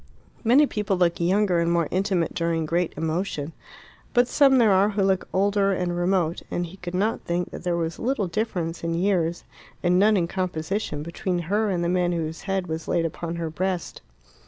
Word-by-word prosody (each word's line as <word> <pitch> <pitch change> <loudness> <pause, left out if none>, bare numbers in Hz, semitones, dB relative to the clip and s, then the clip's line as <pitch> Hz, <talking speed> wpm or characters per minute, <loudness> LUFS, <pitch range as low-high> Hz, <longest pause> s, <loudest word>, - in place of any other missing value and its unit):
Many 255 +6 +6
people 210 -6 -1
look 175 -1 +2
younger 185 +1 +2
and 170 0 +1
more 170 -2 +2
intimate 185 -3 0
during 165 -2 0
great 170 +2 0
emotion. 160 -1 -2 0.6
But 245 0 +5
some 275 0 +5
there 225 -4 +5
are 195 +2 +4
who 205 -1 0
look 190 -1 +1
older, 200 0 +2
and 180 -2 -1
remote, 175 -2 0
and 175 - -2
he 175 +3 -11
could 180 -1 -6
not 210 +5 0
think 175 +1 -2
that - - -8
there 175 -1 0
was 165 -1 -3
little 250 -4 0
difference 175 -4 -3
in 165 0 -1
years, 175 -2 0 0.4
and 180 0 +3
none 210 +1 +5
in 170 -2 +1
composition, 180 -2 -3
between 175 +3 -3 0.2
her 215 0 +2
and 175 -3 0
the - - 0
man 175 0 +1
whose 165 -1 -3
head 190 -1 0
was 160 -1 -5
laid 170 -1 +1
upon 165 +1 -4
her 165 -2 -3
breast. 185 +1 -3
180 Hz, 195 wpm, -24 LUFS, 170-195 Hz, 0.6 s, Many